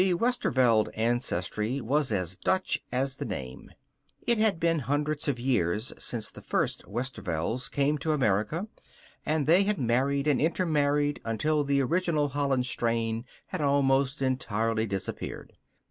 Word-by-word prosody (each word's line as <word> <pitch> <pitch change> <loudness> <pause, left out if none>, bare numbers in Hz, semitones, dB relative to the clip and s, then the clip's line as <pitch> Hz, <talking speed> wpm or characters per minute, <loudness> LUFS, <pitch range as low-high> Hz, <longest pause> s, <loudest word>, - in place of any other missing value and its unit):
The 185 -1 +3
Westerveld 130 - +2
ancestry 115 0 -1
was 140 +2 0
as 90 -3 -1
Dutch 185 - 0
as 135 +1 -1
the - - -4
name. 65 -1 -6 0.6
It 235 -2 +2
had 215 -6 +2
been 165 -1 +2
hundreds 145 +3 -1
of 135 -4 0
years 110 -4 0
since 115 -3 -4
the - - -12
first - - -1
Westervelds 115 -2 -2
came 145 +1 +1
to 155 +3 -1
America, 135 - +1 0.6
and 155 -1 +1
they 170 +5 +5
had 205 +1 +1
married 135 +3 +1
and 150 -3 +2
intermarried 145 -3 +1
until 150 +7 +1
the 140 0 +2
original 160 0 +1
Holland 135 -2 0
strain 115 -1 -1 0.2
had 185 - -3
almost 140 -1 +2
entirely 115 -3 0
disappeared. 100 -2 -5
135 Hz, 140 wpm, -28 LUFS, 115-150 Hz, 0.6 s, they